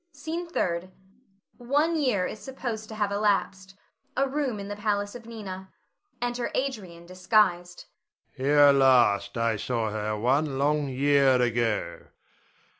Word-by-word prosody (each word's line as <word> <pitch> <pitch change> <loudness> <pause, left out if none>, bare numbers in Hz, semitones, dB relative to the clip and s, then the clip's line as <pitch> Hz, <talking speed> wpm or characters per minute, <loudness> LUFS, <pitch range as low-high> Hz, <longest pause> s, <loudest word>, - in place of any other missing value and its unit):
SCENE 335 +3 -5
THIRD. 175 - -2 0.7
[One 290 +7 +1
year 250 - +1
is 215 - -6
supposed 235 -5 -6
to 220 - -8
have 205 -2 -1
elapsed. 195 -2 -1 0.4
A 275 +1 +2
room 265 -5 -2
in 200 - -6
the 205 - -5
palace 205 -1 -2
of 235 -2 -11
Nina. 190 -4 -8 0.5
Enter 245 0 -2
Adrian 195 -11 -4
disguised.] 180 -1 +1 0.5
Adrian. 135 +2 -1
Here 145 -1 +7
last 120 -7 +3
I 115 -1 0
saw 110 0 -2
her 105 0 -3
one 135 +5 +1
long 145 +1 +1
year 135 -1 +3
ago. 115 -7 -1
185 Hz, 135 wpm, -26 LUFS, 135-220 Hz, 0.7 s, Here